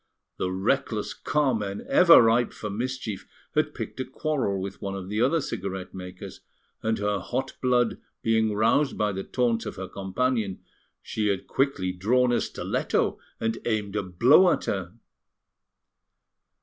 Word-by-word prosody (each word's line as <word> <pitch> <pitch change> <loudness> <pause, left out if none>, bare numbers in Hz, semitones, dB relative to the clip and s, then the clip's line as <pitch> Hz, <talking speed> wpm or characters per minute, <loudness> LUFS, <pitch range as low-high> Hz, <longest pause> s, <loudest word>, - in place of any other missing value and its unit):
The 90 - -1
reckless 95 +1 -1
Carmen, 115 -9 -1
ever 170 -8 +8
ripe 115 +2 +3
for 105 - -5
mischief, 120 -1 -4 0.3
had - - +1
picked - - -6
a - - 0
quarrel 130 -6 -1
with 95 +1 -6
one 100 0 -3
of 95 -1 -6
the 105 +2 -1
other 140 +7 +3
cigarette 95 -6 -5
makers, 90 -1 -8 0.4
and 110 0 0
her 105 -1 0
hot 125 +8 -3
blood 125 -2 +2 0.2
being 110 -1 +2
roused 115 +7 +2
by 105 -1 +1
the 95 0 -4
taunts 120 -3 0
of - - -5
her 95 0 -6
companion, 100 +1 -2 0.4
she 110 -1 -1
had 100 -2 -1
quickly 130 -10 0
drawn 120 +7 +2
a 120 - +2
stiletto, - - -1 0.2
and 115 0 -1
aimed 105 -3 -1
a - - +1
blow 120 - +5
at - - -1
her. 95 -2 -3
110 Hz, 150 wpm, -26 LUFS, 95-125 Hz, 0.4 s, ever